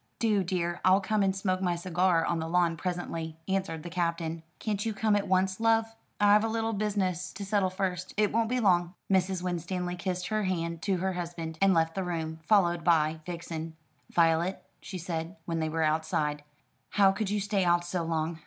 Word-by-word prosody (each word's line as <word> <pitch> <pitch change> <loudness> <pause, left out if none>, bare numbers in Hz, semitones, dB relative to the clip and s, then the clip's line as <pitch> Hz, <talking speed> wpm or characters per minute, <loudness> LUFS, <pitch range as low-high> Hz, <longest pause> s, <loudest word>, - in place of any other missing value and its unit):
"Do, 210 -4 +2
dear. 175 -1 -2
I'll 185 +1 +6
come 210 +2 0
and 190 -1 +2
smoke 185 -1 -1
my 180 -2 +1
cigar 175 -1 +1
on 170 - 0
the 160 - -3
lawn 170 0 +2
presently," 165 -2 -4
answered 190 -5 -2
the 175 - -6
Captain. 170 -1 -1 0.2
"Can't 210 -2 -2
you 225 -2 -2
come 215 +1 +2
at 205 - 0
once, 185 +1 +1
love?" 225 0 +2 0.2
"I've 205 +1 +5
a - - +1
little 225 0 -1
bit 210 +1 -1
of - - 0
business 185 -3 -1
to 200 - -6
settle 195 -1 +1
first. 185 -1 -3
I 215 - +5
won't 225 +2 0
be 250 +1 +1
long!" 180 -4 +2 0.2
Mrs. 190 -1 +2
Winstanley 180 0 -2
kissed 180 0 -3
her 215 -1 0
hand 170 -3 -2
to 195 -2 +1
her 190 +2 -1
husband, 170 -2 -5
and 195 -2 +5
left 165 0 +2
the 190 - -2
room, 160 -2 -3
followed 175 -5 +3
by 160 -1 +3
Vixen. 165 -2 -5 0.3
"Violet," 170 +2 +2 0.2
she 190 -1 -6
said, 165 0 -4
when 165 -1 -2
they 160 0 0
were 160 +1 0
outside, 155 -1 0 0.5
"how 195 -2 +5
could 195 +1 -2
you 210 0 0
stay 200 -1 0
out 175 0 +3
so 175 0 -2
long? 165 0 -2
180 Hz, 205 wpm, -29 LUFS, 165-195 Hz, 0.5 s, I'll